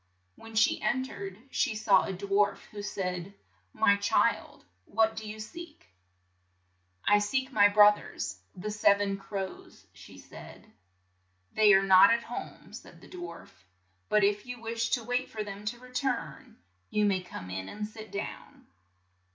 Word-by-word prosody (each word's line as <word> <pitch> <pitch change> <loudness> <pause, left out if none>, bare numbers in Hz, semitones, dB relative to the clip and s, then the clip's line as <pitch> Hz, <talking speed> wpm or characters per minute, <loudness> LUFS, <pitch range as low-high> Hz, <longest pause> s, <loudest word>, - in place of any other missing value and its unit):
When 225 0 -13
she 220 - +3
en 245 +5 0
tered, 195 -6 -8
she 215 - 0
saw 210 -3 +3
a - - -2
dwarf, 200 +2 +1
who 205 - -7
said, 185 -2 -4 0.4
"My 200 - +3
child, 200 - 0 0.2
what 220 +1 +1
do 220 -1 -6
you 215 +1 -8
seek?" 300 - -11 1.1
"I 205 0 +5
seek 260 +6 -1
my 205 -5 +6
broth 205 0 +6
ers, - - -6
the 200 +3 -5
sev 205 -1 +4
en 200 -1 -1
crows," 195 -1 -7
she - - -14
said. - - -13 0.9
"They 210 -2 +6
are 195 - +4
not 190 -1 +7
at 230 0 +2
home," 240 - -8
said - - -12
the - - -15
dwarf, 355 -1 -9 0.6
"but 210 -1 +3
if 205 +3 +1
you 250 0 -6
wish 230 0 -2
to 240 - 0
wait 245 +2 -2
for 215 -1 -4
them 205 0 -8
to 225 +3 -3
re 250 +1 -15
turn, 250 - -3 0.3
you 210 0 +1
may 195 -2 +1
come 90 - -9
in 95 0 -5
and 210 0 -5
sit 215 0 -10
down. 200 +2 -7
210 Hz, 165 wpm, -29 LUFS, 200-225 Hz, 1.1 s, not